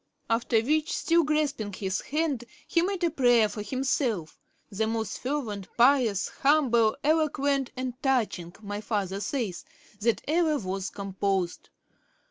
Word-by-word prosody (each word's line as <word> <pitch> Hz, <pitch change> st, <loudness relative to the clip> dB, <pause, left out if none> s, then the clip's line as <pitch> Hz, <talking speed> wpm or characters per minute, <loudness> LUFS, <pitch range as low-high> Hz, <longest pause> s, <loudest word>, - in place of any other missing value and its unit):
After 230 Hz, 0 st, +2 dB
which, 300 Hz, +5 st, +1 dB
still 335 Hz, 0 st, +3 dB
grasping 290 Hz, -9 st, 0 dB
his 190 Hz, 0 st, -2 dB
hand, 290 Hz, -5 st, -1 dB, 0.2 s
he 335 Hz, -, +2 dB
made 375 Hz, 0 st, -1 dB
a 340 Hz, -, +2 dB
prayer 245 Hz, -6 st, +4 dB
for 210 Hz, +1 st, -6 dB
himself, 240 Hz, -, -1 dB, 0.3 s
the 220 Hz, +2 st, 0 dB
most 220 Hz, -2 st, -2 dB
fervent, 240 Hz, -8 st, -3 dB
pious, 240 Hz, -5 st, +4 dB
humble, 250 Hz, -7 st, +4 dB
eloquent, 285 Hz, -3 st, +1 dB
and 255 Hz, -1 st, -3 dB
touching, 215 Hz, -10 st, 0 dB
my 205 Hz, 0 st, -4 dB
father 200 Hz, -3 st, -2 dB
says, 215 Hz, -5 st, -3 dB, 0.4 s
that 230 Hz, +1 st, +1 dB
ever 315 Hz, -1 st, +2 dB
was 195 Hz, -3 st, -3 dB
composed. 195 Hz, -2 st, -2 dB
240 Hz, 130 wpm, -27 LUFS, 205-285 Hz, 0.4 s, prayer